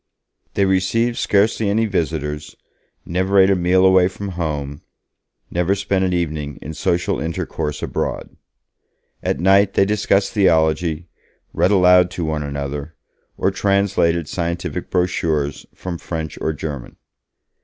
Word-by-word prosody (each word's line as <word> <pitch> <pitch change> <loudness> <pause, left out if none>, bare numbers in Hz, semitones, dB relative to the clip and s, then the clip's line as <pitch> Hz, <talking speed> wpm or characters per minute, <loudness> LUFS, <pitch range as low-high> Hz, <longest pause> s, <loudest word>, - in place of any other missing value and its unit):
They 100 - +3
received 105 +6 +1
scarcely 105 +1 +2
any 110 +3 +2
visitors, 75 -6 -3 0.5
never 95 +3 0
ate 95 +1 +6
a - - +4
meal 90 +1 +3
away 95 -1 +5
from 100 +1 -6
home, 75 -5 -4 0.7
never 90 +3 +1
spent 95 -1 0
an 95 - +1
evening 75 -5 -2
in 80 - -7
social 85 +2 0
intercourse 80 -1 -3
abroad. - - -3 0.9
At - - -1
night 100 +2 +4
they 95 - +4
discussed 100 -1 +1
theology, 80 -4 +2 0.5
read - - +2
aloud 90 -2 +5
to 85 - -1
one 80 -1 -2
another, 70 +1 -5 0.4
or 95 - +1
translated 95 -4 +1
scientific 85 0 -3
brochures 80 -5 -1
from 90 -2 -6
French 80 -2 -5
or 80 - 0
German. 75 -4 -6
90 Hz, 130 wpm, -20 LUFS, 80-95 Hz, 0.9 s, ate